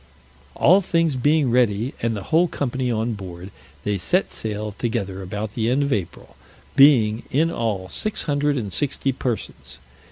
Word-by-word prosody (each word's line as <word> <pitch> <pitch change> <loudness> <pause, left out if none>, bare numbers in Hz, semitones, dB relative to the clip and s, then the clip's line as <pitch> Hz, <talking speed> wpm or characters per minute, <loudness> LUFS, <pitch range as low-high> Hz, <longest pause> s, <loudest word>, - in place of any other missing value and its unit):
All 185 +6 +5
things 165 -5 +1
being 145 +1 +2
ready, 120 0 +2
and 115 -2 0
the 100 - -6
whole 165 - +3
company 130 -4 -2
on 115 +1 -1
board, 95 -2 -8 0.3
they 105 -1 -1
set 185 - 0
sail 105 -1 -4
together 100 -3 -3
about 105 +3 -5
the 115 -1 0
end 135 +3 +2
of 140 -1 0
April, 85 -9 -5 0.4
being, 125 -6 +5
in 160 +5 +2
all, 105 - -2
six 215 - -2
hundred 145 -1 0
and 105 -6 -3
sixty 140 -1 0
persons. 125 -3 -5
120 Hz, 160 wpm, -22 LUFS, 105-145 Hz, 0.4 s, All